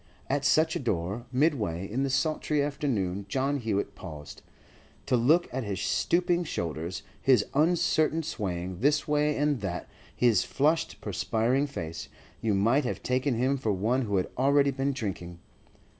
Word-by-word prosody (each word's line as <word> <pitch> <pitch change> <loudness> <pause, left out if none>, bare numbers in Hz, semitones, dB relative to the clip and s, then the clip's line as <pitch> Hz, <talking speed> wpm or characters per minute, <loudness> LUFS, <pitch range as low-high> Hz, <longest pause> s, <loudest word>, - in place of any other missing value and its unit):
At 140 +1 0
such 160 +3 +3
a - - -1
door, 105 0 -2
midway 120 - 0
in 120 +7 -2
the 140 - 0
sultry 150 +2 0
afternoon, 110 -10 -1
John 140 +4 0
Hewett 110 -4 -1
paused. 75 -6 -9 0.6
To 135 - +2
look 150 +9 +3
at 130 0 -2
his 100 -3 -3
stooping 175 0 +1
shoulders, 85 - -4 0.2
his 125 -6 +4
uncertain 160 0 +2
swaying 90 - -4
this 145 +5 +2
way 150 0 +1
and 145 -2 +1
that, 90 -3 -4 0.3
his 115 -6 +3
flushed, 155 +4 0
perspiring 125 +6 0
face, 85 - -6 0.3
you 110 -3 +1
might 115 +9 +3
have 125 - -4
taken 130 +1 0
him 130 +4 +1
for 115 -5 -1
one 110 +7 +1
who 100 -5 0
had 90 - -1
already 140 +1 +4
been 135 +1 -1
drinking. 95 -9 -5
130 Hz, 155 wpm, -28 LUFS, 100-145 Hz, 0.6 s, his